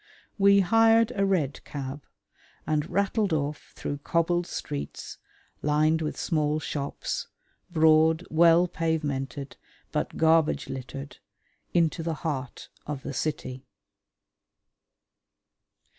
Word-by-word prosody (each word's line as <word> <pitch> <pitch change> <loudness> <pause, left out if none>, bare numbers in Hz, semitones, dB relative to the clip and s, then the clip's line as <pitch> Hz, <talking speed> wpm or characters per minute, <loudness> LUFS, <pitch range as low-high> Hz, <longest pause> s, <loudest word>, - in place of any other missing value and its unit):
We 200 0 +6
hired 225 +4 +4
a 195 -1 +2
red 155 -8 0
cab, 140 0 -6 0.6
and 150 -1 0
rattled 200 +1 +1
off 145 -1 -3
through 145 - -4
cobbled 170 +3 0
streets, 70 0 -6 0.4
lined 155 +2 +2
with 155 - -3
small 155 -2 0
shops, 145 -2 -4 0.4
broad, 160 0 +4
well 170 +2 +5
pavemented 145 -5 -3 0.3
but - - -2
garbage 160 -2 +3
littered, 135 +1 -7 0.6
into 165 0 +2
the 165 0 -2
heart 135 -5 -4 0.2
of 145 -2 -4
the 140 - -5
city. 130 -3 -3
155 Hz, 100 wpm, -27 LUFS, 145-170 Hz, 0.6 s, We